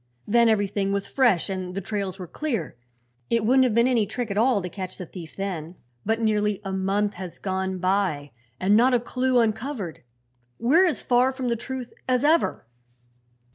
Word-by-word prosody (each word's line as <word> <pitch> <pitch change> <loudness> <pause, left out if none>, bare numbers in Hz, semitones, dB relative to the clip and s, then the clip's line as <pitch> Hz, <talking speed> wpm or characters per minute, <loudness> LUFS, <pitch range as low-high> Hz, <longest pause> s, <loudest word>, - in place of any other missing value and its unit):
"Then 235 +2 +4
everything 200 -2 +1
was 200 0 -1
fresh 240 -11 +2
and 185 -2 -4
the - - -1
trails 195 -1 -3
were 185 - -6
clear. 230 - -3 0.5
It 230 -2 +1
wouldn't 260 +3 +5
have 235 -4 0
been 235 +1 +4
any 235 -5 +2
trick 225 +1 -4
at - - -2
all 240 -2 +3
to - - -3
catch 185 +1 -7
the 180 - -6
thief 165 -2 -10
then; 180 -4 -4 0.3
but 225 +2 0
nearly 210 -2 +1
a 195 - -4
month 195 +2 0
has 180 -1 -8
gone 190 -1 -2
by 185 -6 0 0.3
and 195 +3 +3
not 250 +3 +5
a - - +3
clew 255 +1 +1
uncovered. 220 - -2 0.6
We're 320 +11 +4
as 330 - -1
far 250 +1 +3
from 260 -2 -3
the 235 - +1
truth 255 +1 -6 0.2
as 250 0 +2
ever." 320 +3 +2
210 Hz, 185 wpm, -25 LUFS, 190-245 Hz, 0.6 s, wouldn't